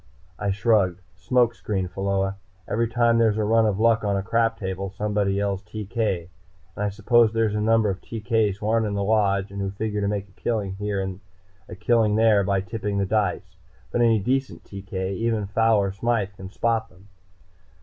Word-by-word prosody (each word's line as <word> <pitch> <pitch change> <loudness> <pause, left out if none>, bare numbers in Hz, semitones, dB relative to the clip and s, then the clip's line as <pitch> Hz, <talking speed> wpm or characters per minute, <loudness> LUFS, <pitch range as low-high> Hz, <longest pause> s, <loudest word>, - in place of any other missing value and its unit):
I 100 - -1
shrugged. 100 -3 +2 0.2
"Smoke 120 +6 +2
screen, 100 -4 -3
Pheola. 95 +1 -1 0.3
Every 115 +2 0
time 115 0 +2
there's 110 -2 +3
a 110 - +1
run 110 +1 +3
of 100 -1 -1
luck 115 0 +3
on 100 -1 0
a 95 - -2
crap 115 +3 +1
table, 95 0 -4
somebody 100 0 -1
yells 100 -1 -1
'TK!' 105 -4 -3 0.5
And 105 - -3
I 105 - +1
suppose 110 +3 +3
there's 115 -2 +1
a 105 - -1
number 110 0 +3
of 95 - -6
TK's 110 -2 -1
who 105 - -5
aren't 110 0 +2
in 100 - -3
the 100 - -1
Lodge, 100 -2 +1
and 100 0 -5
who 95 - -1
figure 105 +1 -3
to 100 - 0
make 100 -1 -2
a - - -23
killing 100 -2 -2
here 105 -1 -2
and 95 -1 -4 0.5
a 85 - -7
killing 110 +1 +2
there 110 -2 +4
by 95 0 +1
tipping 100 0 -4
the 100 - +1
dice. 95 -3 -1 0.3
But 120 - 0
any 115 -2 +4
decent 130 +6 -2
TK, 95 -1 -5
even 115 -2 0
a - - -3
Fowler 105 -1 +2
Smythe, 100 -1 -1
can 95 0 -9
spot 115 +2 -1
them. 90 +1 -20
105 Hz, 200 wpm, -24 LUFS, 95-115 Hz, 0.5 s, there